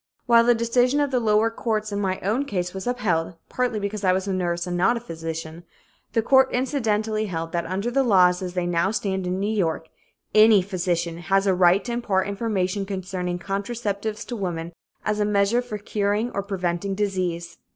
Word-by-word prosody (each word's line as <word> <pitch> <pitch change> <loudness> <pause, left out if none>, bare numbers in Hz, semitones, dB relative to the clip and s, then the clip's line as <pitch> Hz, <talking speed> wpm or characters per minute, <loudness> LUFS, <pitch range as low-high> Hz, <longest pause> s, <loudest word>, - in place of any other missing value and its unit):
While 235 -1 +5
the 240 0 +5
decision 245 +4 +2
of 290 -1 +1
the 255 - +2
lower 220 0 +2
courts 215 -2 -2
in 200 - -2
my 190 -2 -1
own 225 +9 0
case 180 -7 -3
was 190 +4 -6
upheld, 180 -9 0
partly 250 -3 -1
because 205 0 -4
I 185 -1 +4
was 190 +1 -1
a 195 - 0
nurse 175 -1 -1
and 180 -1 -3
not 190 +7 +3
a - - -3
physician, 165 -4 -6 0.5
the 225 - +2
court 265 +2 +5
incidentally 220 -5 0
held 165 -3 -4
that 170 -1 -2
under 195 +7 -2
the 275 +2 +2
laws 185 -7 +4
as 180 -1 -5
they 180 -1 0
now 175 +1 +1
stand 190 -3 -2
in 180 +1 -1
New 210 +2 -1
York, 160 -4 -1 0.4
any 215 -2 +6
physician 175 -3 -2
has 195 +3 +1
a 195 - +3
right 180 +1 +4
to 245 - -3
impart 205 -6 0
information 200 -2 -1
concerning 185 -2 -3
contraceptives 205 +2 -3
to 245 - -5
women 175 -5 -4 0.3
as 210 0 0
a - - +3
measure 205 +3 +2
for 245 -4 -6
curing 210 +2 -1
or 200 - -2
preventing 195 -1 -2
disease. 180 -4 -2
200 Hz, 195 wpm, -24 LUFS, 180-220 Hz, 0.5 s, any